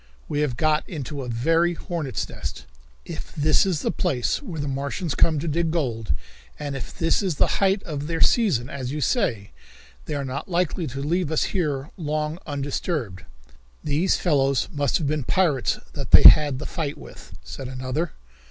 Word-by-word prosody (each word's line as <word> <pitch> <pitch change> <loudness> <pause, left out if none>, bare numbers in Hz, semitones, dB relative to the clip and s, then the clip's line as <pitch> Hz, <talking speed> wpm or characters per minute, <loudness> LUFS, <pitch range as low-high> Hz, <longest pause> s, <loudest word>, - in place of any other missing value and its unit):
We 145 - -2
have 140 -6 0
got 155 +1 +1
into 145 -3 -5
a 125 - -5
very 165 +9 +2
hornet's 165 -7 -3
nest! - - -7 0.4
If - - -8
this 155 +5 +3
is 175 -6 0
the - - 0
place 125 - 0
where 180 - -6
the 145 - -2
Martians 140 +4 -2
come 160 -2 +3
to 145 - -3
dig 165 +2 +1
gold, 120 - -1 0.4
and 145 -2 -4
if 130 - -6
this 165 +2 +2
is 185 -5 -1
the - - +1
height 195 0 +3
of 150 -2 -4
their 165 0 -2
season, 175 - +3
as 130 -2 -5
you 150 - -3
say, 115 - 0 0.5
they 150 - -3
are 140 -1 -2
not 130 +7 -5
likely 175 -1 0
to 135 +1 -5
leave 170 +1 0
us 160 - +2
here 150 -6 -1
long 155 0 -2
undisturbed." 140 - -3 0.6
"These 150 +5 +2
fellows 140 -6 +2
must 145 -3 +1
have 160 - -2
been 150 0 0
pirates 155 -4 +1 0.2
that - - -5
they - - +8
had 145 -3 +8
the 150 - -6
fight 155 -5 -3
with," - - -12
said 135 - -7
another. 130 +6 -3
150 Hz, 180 wpm, -24 LUFS, 135-165 Hz, 0.6 s, they